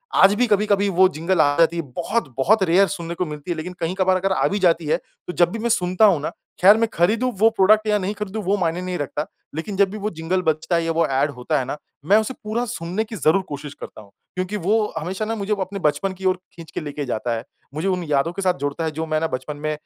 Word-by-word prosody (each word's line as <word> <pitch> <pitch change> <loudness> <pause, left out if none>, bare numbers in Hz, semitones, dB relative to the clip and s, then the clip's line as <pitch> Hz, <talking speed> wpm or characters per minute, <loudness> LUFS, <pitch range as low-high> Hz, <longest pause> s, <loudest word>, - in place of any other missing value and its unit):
आज 195 +1 +6
भी 250 - +3
कभी-कभी 205 -1 +2
वो 190 0 +5
जिंगल 175 +3 +1
आ 145 0 +3
जाती 165 0 +4
है, - - 0
बहुत 175 - -2
बहुत 195 +10 +3
रेयर 190 +2 +4
सुनने 170 +1 -5
को 180 - -1
मिलती 150 +2 -6
है। 170 - -2
लेकिन 180 +3 -5
कहीं 170 +2 -2
कभार 190 -1 +2
अगर 190 +1 -1
आ - - +2
भी 205 - -1
जाती 170 -3 +2
है, 150 - +2
तो 180 - -11
जब 175 -1 +3
भी 225 - -4
मैं 235 +2 -1
सुनता 185 -2 +3
हूँ 190 -7 +4
ना 150 - -2 0.3
खैर 200 +4 +8
मैं 230 0 +2
खरीदूँ 220 +9 +2
वो 220 +3 +5
प्रोडक्ट 215 +1 +3
या 210 0 +3
नहीं 195 +2 -2
खरीदूँ 210 +1 -5
वो 195 +2 +1
मायने 175 -1 -1
नहीं 180 -1 -3
रखता। 145 +1 -3 0.3
लेकिन 180 +6 -4
जब 200 -1 +4
भी 215 - -6
वो 210 +1 -2
जिंगल 170 +1 -2
बजता 160 +1 0
है 170 - +1
या 165 - 0
वो 165 0 +2
एड 140 +3 +1
होता 140 +4 -1
है 130 - -2
ना, 135 - -4 0.3
मैं 200 +6 +5
उसे 220 +4 0
पूरा 220 +3 -1
सुनने 185 -1 -3
की 225 0 -8
ज़रूर 180 -1 +3
कोशिश 145 0 -6
करता 110 - -10
हूँ। 100 -2 -18 0.2
क्योंकि 185 +3 -2
वो 210 +3 +1
हमेशा 185 +6 -3
ना 225 +1 -2
मुझे 205 0 -1
वो 200 - -3
अपने 195 +2 -7
बचपन 185 +4 0
की 190 +1 -9
ओर 185 -1 +3 0.2
खींच 165 -1 -12
के - - -4
लेके 145 -1 -5
जाता 120 -1 -2
है, 115 - -5 0.3
मुझे 160 +6 -2
उन 185 -2 0
यादों 145 +3 +2
के 195 - -5
साथ 185 -2 +2
जोड़ता 145 +3 -2
है 160 - -1
जो 160 +2 -4
मैं 155 -1 0
ना 165 - 0
बचपन 130 +2 -5
में 155 +1 -2
180 Hz, 275 wpm, -22 LUFS, 155-200 Hz, 0.3 s, खैर